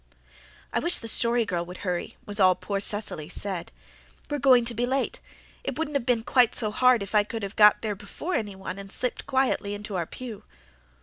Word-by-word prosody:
"I - - +2
wish 345 - +2
the 230 - -6
Story 235 +1 +3
Girl 175 -4 -1
would 180 +3 -9
hurry," 180 -2 -3
was 205 0 -2
all 185 -2 +6
poor 200 +3 -3
Cecily 200 -7 -4
said. 185 -2 -3 0.6
"We're 290 - 0
going 255 -3 +5
to 235 - -2
be 240 +2 -1
late. 265 +2 -1 0.4
It - - -4
wouldn't 310 -2 -2
have 275 -3 -1
been 235 -3 +2
quite 245 -1 +3
so 215 -3 -1
hard 250 -1 +4
if 200 - -9
I 210 -1 +5
could 220 +1 -6
have 200 +2 -5
got 210 +1 +6
there 215 -2 -1
before 205 - -6
anyone 195 - -3
and 195 0 -8
slipped 250 -1 -3
quietly 260 -7 +1
into 205 -1 -6
our 170 -3 -1
pew." 225 -5 -8
215 Hz, 205 wpm, -26 LUFS, 200-250 Hz, 0.6 s, all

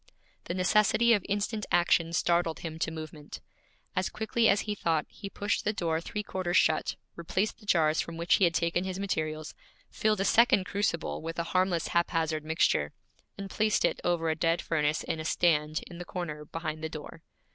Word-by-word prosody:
The 175 - -3
necessity 210 +5 +4
of 205 - +2
instant 210 +1 -1
action 170 -1 +3
startled 170 -1 +1
him 160 -1 -6
to 165 - 0
movement. 155 -2 -8 0.6
As 185 - 0
quickly 220 +1 +1
as 200 - +3
he 210 - -3
thought, 165 -6 0
he 200 - -9
pushed 205 +1 -1
the 210 - 0
door 165 -5 -1
three 210 +4 -4
quarters 185 -3 -1
shut, 155 0 +2 0.2
replaced 185 +6 -2
the 210 - -17
jars 160 -4 +3
from 170 -1 -7
which 170 +1 +1
he 195 - +4
had 170 -1 +1
taken 170 +1 +1
his 185 -1 -4
materials, 155 -5 -3 0.4
filled 215 -2 +1
a - - +1
second 230 -4 +5
crucible 190 -3 -2
with 165 +1 -5
a 170 - 0
harmless 185 -3 +1
haphazard 165 -2 0
mixture, 160 +1 +1 0.4
and 195 -1 -7
placed 215 0 +2
it - - -1
over 165 -2 +1
a - - -1
dead 165 +1 +1
furnace 150 -1 0
in 160 - -3
a - - -4
stand 155 -2 +1
in 175 -1 -10
the - - -4
corner 155 -5 -5
behind 155 0 -5
the 160 - -2
door. 155 +1 -9
170 Hz, 190 wpm, -29 LUFS, 160-195 Hz, 0.6 s, second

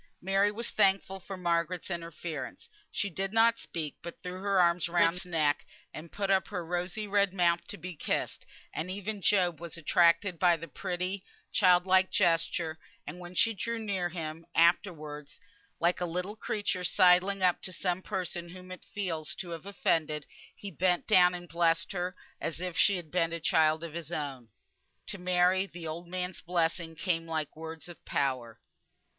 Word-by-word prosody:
Mary 195 +2 +2
was 230 +3 -3
thankful 195 0 +2
for 195 +1 -8
Margaret's 175 +1 -1
interference. 170 -2 -5 0.2
She 205 - -1
did 195 +1 -3
not 225 +1 +4
speak, 155 -3 -5
but 170 - -7
threw 180 +1 -6
her 200 -1 +2
arms 170 -1 +3
round 170 0 +4
Margaret's 180 - -6
neck, 155 -4 +1 0.3
and 155 +1 -9
put 195 -1 -1
up 190 -1 +3
her 180 -4 -4
rosy 180 +5 -2
red 200 -1 +2
mouth 170 -2 +2
to 205 - -5
be 180 -2 -7
kissed; - - -2 0.3
and 160 +4 -3
even 200 +2 -4
Job 180 -4 +3
was 170 -1 -6
attracted 170 +2 +3
by 175 -2 +5
the 165 +1 -8
pretty, 185 +3 -3 0.3
child 180 -3 +5
like 185 0 +4
gesture; 165 -1 +1 0.3
and 160 +5 -7
when 175 0 -9
she 225 +3 +4
drew 230 +3 -3
near 195 -5 -1
him, 160 -1 -5
afterwards, 155 -4 +1 0.4
like 175 +2 +2
a - - +1
little 180 +5 -3
creature 205 -4 -2
sidling 185 +2 +4
up 180 -1 +3
to 185 - -6
some 180 0 -1
person 175 -2 -4
whom 185 +1 -11
it 185 - -8
feels 165 -6 -3
to 180 - -6
have 165 +3 -7
offended, 155 -6 0 0.3
he 200 - -8
bent 180 +1 +1
down 180 -4 +6
and 175 0 -8
blessed 165 +2 +1
her, 180 0 -3 0.2
as 165 - -3
if 180 -1 -4
she 200 - +4
had 170 -4 -6
been 165 -2 +1
a 170 - -3
child 160 0 +3
of 165 -2 -6
his 170 -1 -6
own. 135 -7 -4 0.6
To 200 - -6
Mary 180 +1 +3
the 175 -3 -9
old 165 +2 -5
man's 180 +1 -3
blessing 170 -1 0
came 165 -1 -1
like 160 -2 -3
words 160 0 -7
of 175 -3 -12
power. 130 -5 -1
175 Hz, 180 wpm, -30 LUFS, 165-190 Hz, 0.6 s, down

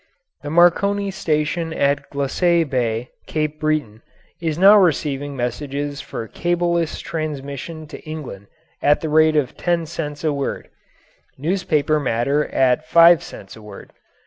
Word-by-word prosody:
The 145 - -6
Marconi 195 +5 +3
station 160 -1 -1
at 140 -1 0
Glacé 165 +4 +1
Bay, 120 -3 -2 0.2
Cape 155 -1 -2
Breton, 150 -8 -1 0.4
is 160 -2 -2
now 195 +4 +8
receiving 145 -7 +1
messages 140 +3 -3
for 115 - -7
cableless 170 0 -1
transmission 155 0 -5
to 150 - -10
England 150 -11 -8 0.3
at 145 +1 +3
the 160 - -3
rate 155 0 +4
of 145 -5 0
ten 170 -2 -1
cents 150 -2 -6
a 155 -2 +1
word 140 -1 -4 0.7
newspaper 155 -2 0
matter 140 +3 0
at 130 +4 +1
five 170 -1 +6
cents 95 - -11
a 110 - -13
word. 105 -2 -12
150 Hz, 135 wpm, -20 LUFS, 140-165 Hz, 0.7 s, now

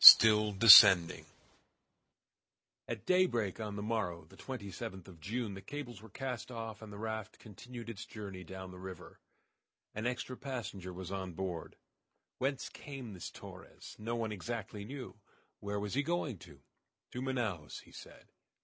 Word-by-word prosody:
STILL 105 -1 +11
DESCENDING 95 -4 +9 1.6
At - - -5
daybreak 120 - +2
on 105 -2 -4
the 105 - -4
morrow, 90 -7 -2
the - - -16
27th 100 -6 -7
of 90 -4 -13
June, 105 +5 -3
the 95 - -8
cables 125 -7 -7
were 110 - -13
cast 125 +2 -5
off, 115 -3 -6
and 110 -1 -9
the 100 - -8
raft 110 0 -4
continued 120 +3 -10
its 105 -3 -7
journey 100 -4 -7
down 95 +1 -8
the 90 - -11
river. 95 0 -9 0.7
An 110 +3 -2
extra 125 +1 -3
passenger 120 -9 -5
was 90 0 -7
on 95 -2 -4
board. 90 -2 -4 0.6
Whence 135 +1 -1
came 135 -7 -8
this 90 - -6
Torres? - - -11
No 115 +2 -2
one 115 -2 -2
exactly 105 0 -5
knew. 130 -1 -8 0.4
Where 100 0 -3
was 105 0 -4
he 140 - +2
going 150 - -1
to? 75 -6 -14 0.5
"To 125 - -5
Manaos," 120 - -2
he - - -19
said. - - -13
105 Hz, 155 wpm, -34 LUFS, 95-120 Hz, 1.6 s, STILL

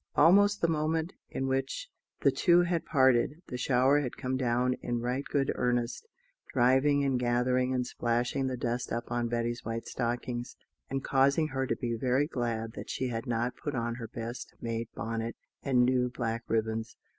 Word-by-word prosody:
Almost 205 +6 +5
the 170 - +4
moment 160 +1 0 0.2
in 135 - -3
which 135 - -1 0.3
the - - +5
two 175 -1 +4
had 175 -1 0
parted, 130 +3 +3
the 125 - -4
shower 130 +3 +4
had 130 -4 -4
come 130 0 -2
down 125 0 +1
in 120 -1 -2
right 125 +3 -1
good 135 -2 0
earnest, 120 - -1 0.4
driving 135 +3 +4
and 135 -2 +1
gathering 125 +1 +1
and 125 -1 0
splashing 120 +3 0
the 130 -1 -2
dust 120 +1 -2
up 120 +1 -3
on 120 -1 0
Betty's 120 0 -2
white 115 0 -4
stockings, 120 0 -3 0.3
and 135 0 -2
causing 140 +3 +3
her 135 -1 -1
to - - 0
be 120 -3 -2
very 130 +4 +1
glad 115 -6 -2
that - - -8
she 130 - -2
had 115 -1 -4
not 120 +1 -1
put 145 -2 -4
on 120 -1 -1
her 115 -1 -6
best 115 +1 -7
made 115 0 -3
bonnet 115 0 -3 0.3
and 125 -2 +3
new 125 0 +2
black 115 -2 -3
ribbons. 110 0 -1
125 Hz, 180 wpm, -30 LUFS, 120-135 Hz, 0.4 s, Almost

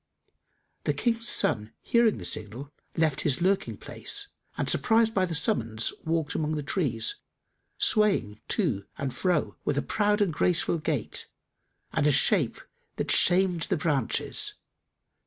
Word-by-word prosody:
The - - 0
King's 230 -1 0
son 110 0 +2
hearing 235 -2 +2
the - - -6
signal, 115 +7 -3 0.3
left 155 -4 +1
his 140 -3 +1
lurking 190 +2 0
place 410 0 -2 0.3
and, - - -1
surprised 225 0 +3
by 190 -3 +1
the 165 - -3
summons, 115 - 0
walked 160 -2 -1
among 155 0 -1
the 150 - -3
trees, 135 - -1 0.6
swaying 190 - +2
to 125 - 0
and 135 -2 -3
fro 180 -5 -1
with 140 - -1
a - - 0
proud 210 0 +1
and 200 -6 +1
graceful 170 +1 +1
gait 150 -7 -1 0.7
and 145 - +2
a - - +5
shape - - +2 0.4
that - - -2
shamed 180 -2 +3
the 190 - +1
branches. 140 -6 0
160 Hz, 140 wpm, -27 LUFS, 135-200 Hz, 0.7 s, a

